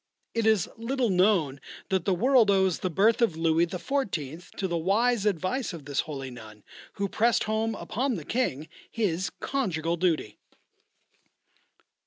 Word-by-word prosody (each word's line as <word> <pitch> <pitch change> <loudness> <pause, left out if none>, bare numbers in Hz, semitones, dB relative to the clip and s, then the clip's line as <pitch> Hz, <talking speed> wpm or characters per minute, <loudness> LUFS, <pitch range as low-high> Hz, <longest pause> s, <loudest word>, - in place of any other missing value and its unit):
It 230 -1 +1
is 215 -5 +3
little 240 0 0
known 180 -8 +2 0.3
that 190 -3 0
the 195 - +2
world 245 +1 +4
owes 190 -3 +3
the 185 - -1
birth 210 +8 +3
of 185 -9 +2
Louis 165 +1 +2
XIV. 175 - -3
to 190 - -3
the 170 - -2
wise 210 +6 +2
advice 200 +5 -1
of 160 -5 -9
this 145 -1 -2
holy 135 -4 -4
nun, 110 -3 -12 0.3
who 200 - -2
pressed 230 +4 +2
home 220 +1 -1
upon 255 +4 -2
the 160 -6 -7
King 155 - -1 0.2
his 190 -5 -1
conjugal 170 - -1
duty. 160 - 0
190 Hz, 150 wpm, -27 LUFS, 160-225 Hz, 0.3 s, world